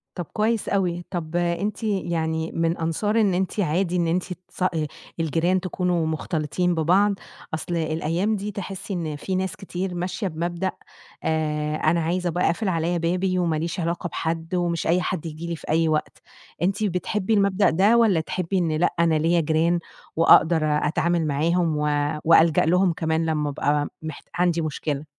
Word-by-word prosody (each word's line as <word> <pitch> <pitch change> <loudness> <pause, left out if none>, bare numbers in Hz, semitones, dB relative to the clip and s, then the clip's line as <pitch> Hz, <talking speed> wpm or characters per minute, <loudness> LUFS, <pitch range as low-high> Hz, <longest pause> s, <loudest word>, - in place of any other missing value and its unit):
طَب 175 -3 -4
كويس 220 +1 0
أوي. 175 -3 0
طَب 170 -2 -4
أنتِ 175 +6 -1
يعني 165 -5 -1
من 165 +1 0
أنصار 205 +7 0
إن 200 -4 +3
أنتِ 190 +3 -1
عادي 180 +1 0
إن 170 -1 +1
أنتِ 175 +2 0 0.2
تص - - -8
آآ 165 -4 +1 0.3
الجيران 165 +4 +1
تكونوا 180 -2 -1
مختلطين 160 +2 -1
ببعض؟ 185 +6 +3 0.4
أصل 170 +2 -3
الأيام 165 +6 0
دي 205 +1 -4
تحسي 195 0 -5
إن 160 -4 -3
فيه 185 +5 -3
ناس 185 -1 -2
كتير 190 -1 -4
ماشية 180 +4 -3
بمبدأ 175 +3 -2 0.5
آآ 150 -1 -1
أنا 160 +2 +2
عايزة 175 +2 0
أبقى 175 +2 0
أقفل 190 +6 0
عليَّ 170 0 0
بابي، 185 +2 0
وما 170 -3 +1
ليش 170 +4 -3
علاقة 170 +1 -2
بحد، 165 +1 -3
ومش 175 -2 -1
أي 175 +2 +3
حد 180 -2 -3
ييجي 160 +1 -6
لي 170 - -2
في - - -12
أي 160 +1 +3
وقت، 155 -1 -1 0.4
أنتِ 195 +4 0
بتحبي 200 +2 -1
المبدأ 200 -1 +3
ده، 200 +8 +4
والّا 215 -7 +4
تحبي 180 +3 -2
إن 170 -3 +1
لأ، 175 - +2
أنا 165 -1 +3
ليَّ 165 +2 +2
جيران، 160 +2 +2 0.4
وأقدر 165 0 +5
أتعامل 160 +2 +1
معاهم، 160 +2 +1
و 150 0 0 0.4
وألجأ 165 -1 +5
لهم 180 +2 +3
كمان، 160 0 0
لمّا 150 -2 0
أبقى 145 +1 0 0.2
محت 155 -2 -7
عندي 175 -1 +2
مشكلة؟ 150 -1 -3
170 Hz, 170 wpm, -24 LUFS, 160-185 Hz, 0.5 s, وأقدر